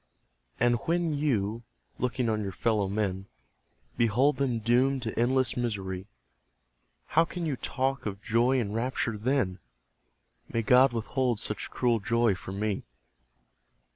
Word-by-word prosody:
And 120 0 +3
when 170 -1 +1
you, 115 -7 0 0.4
looking 125 0 0
on 110 -1 0
your 100 -2 -3
fellow 105 +1 0
men, 95 -2 -2 0.7
Behold 125 +5 +3
them 130 -4 0
doomed 125 +4 +2
to 110 - -3
endless 130 +2 +2
misery, 95 -6 -3 1.0
How 165 - +5
can 170 0 -5
you 150 -4 -1
talk 135 0 -2
of 100 -1 -4
joy 120 +4 +2
and 105 -4 -2
rapture 115 0 -1
then? 105 -4 0 0.9
May 115 - 0
God 125 +4 +6
withhold 120 0 -1
such 105 -2 -3
cruel 120 -2 +1
joy 115 +1 +2
from 95 +1 -7
me! 105 -2 -1
120 Hz, 135 wpm, -28 LUFS, 105-130 Hz, 1.0 s, God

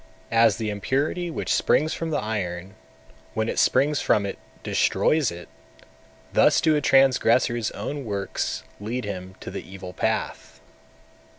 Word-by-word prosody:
240. 115 0 +5
As 105 - 0
the 110 -2 -2
impurity 140 - -1
which 165 - -2
springs 155 +2 +2
from 165 - -3
the 155 - 0
iron, 95 -4 -3 0.6
when 110 0 0
it - - -1
springs 140 +2 +3
from 100 - +2
it, 100 - -5 0.2
destroys 155 -5 +2
it; 85 0 -9 0.9
thus - - +5
do 155 -1 +3
a 150 - +1
transgressor's 125 -4 +3
own 145 -1 -5
works 100 - -3 0.2
lead 115 +3 -4
him 95 -2 -6
to - - -7
the - - -5
evil 95 -1 -9
path. - - -3
115 Hz, 150 wpm, -24 LUFS, 100-140 Hz, 0.9 s, 240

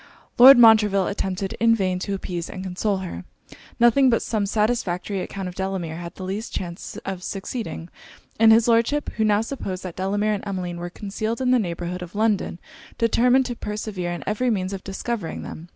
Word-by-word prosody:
Lord 265 +2 +11
Montreville 215 -4 +6
attempted 195 -1 -3
in 230 0 +4
vain 185 -4 -1
to 195 +2 -3
appease 175 -3 -5
and 185 - -7
console 190 +2 -1
her. 90 - -7 0.6
Nothing 240 +3 +5
but 230 - +2
some 210 -3 -1
satisfactory 205 -3 -1
account 195 0 -5
of 180 - -6
Delamere 190 -4 -3
had 170 0 -8
the - - -8
least 200 +5 -4
chance 175 -1 -6
of 190 -2 -4
succeeding; 195 -2 -5 0.5
and 225 0 +7
his 225 +1 +5
Lordship, 235 +6 +2
who 220 - +2
now 210 -1 +3
supposed 210 -6 -5
that 185 -3 -6
Delamere 205 +3 0
and 205 - -4
Emmeline 180 -3 -4
were 175 0 -5
concealed 215 +4 -4
in 255 -1 +1
the 255 - +4
neighbourhood 175 -2 -4
of 180 +2 -9
London, 210 -5 0 0.4
determined 250 +3 +3
to 245 - -4
persevere 210 -5 -4
in 175 - -5
every 215 +5 0
means 190 -3 -1
of 190 - -6
discovering 200 -1 -4
them. 165 +2 -9
200 Hz, 185 wpm, -23 LUFS, 185-225 Hz, 0.6 s, Lord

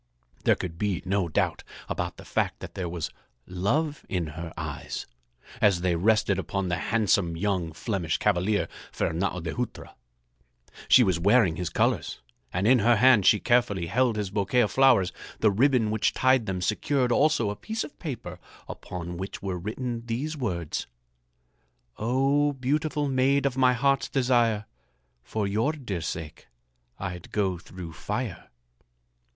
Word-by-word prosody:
There - - +5
could 85 -2 -6
be 100 -4 -1
no 95 -2 0
doubt - - 0 0.2
about - - -3
the - - -12
fact - - -1
that - - -8
there 90 -3 -3
was 85 -2 -4 0.3
love 140 - -1
in 85 -4 -1
her 85 0 -6
eyes - - -5 0.6
as 100 -4 +4
they 90 -1 +1
rested 100 +1 +2
upon 95 -1 -2
the 85 - 0
handsome 100 -6 +2
young 90 -3 -1
Flemish 85 -1 -2
cavalier, 100 +1 +1 0.2
Fernâo 90 +1 -1
de 80 - -3
Hutra. 125 0 -5 0.9
She 130 - +7
was 95 -6 +1
wearing 100 -2 +4
his 90 -2 -2
colors - - 0 0.3
and 90 +3 -1
in 125 +2 +6
her 120 +3 +4
hand 115 -4 +5
she 105 - +6
carefully 120 -8 +2
held 120 +5 +1
his 105 -3 -3
bouquet 105 +5 +2
of 105 - +1
flowers. 120 -10 +4 0.3
The 110 - +4
ribbon 120 0 +3
which 110 -1 +1
tied 130 -3 +3
them 95 -2 -2
secured 125 +8 +1
also 135 -6 +3
a - - -5
piece 220 - -4
of - - -11
paper 115 - -6 0.3
upon 85 -1 -6
which 95 +2 -6
were 95 -2 -3
written 115 +4 -4
these 135 +7 -2
words: 90 - -3 1.1
"Oh, 135 +5 +2
beautiful 145 +3 -1
maid 135 +1 +2
of 135 -2 +1
my 130 -1 +4
heart's 135 0 +1
desire, 120 -5 +2 0.6
For 105 - -3
your 110 +9 +1
dear 120 - -5
sake 80 0 -6 0.5
I'd 90 -2 -6
go 95 -4 0
through 85 -1 -9
fire." - - -4
105 Hz, 155 wpm, -27 LUFS, 90-125 Hz, 1.1 s, She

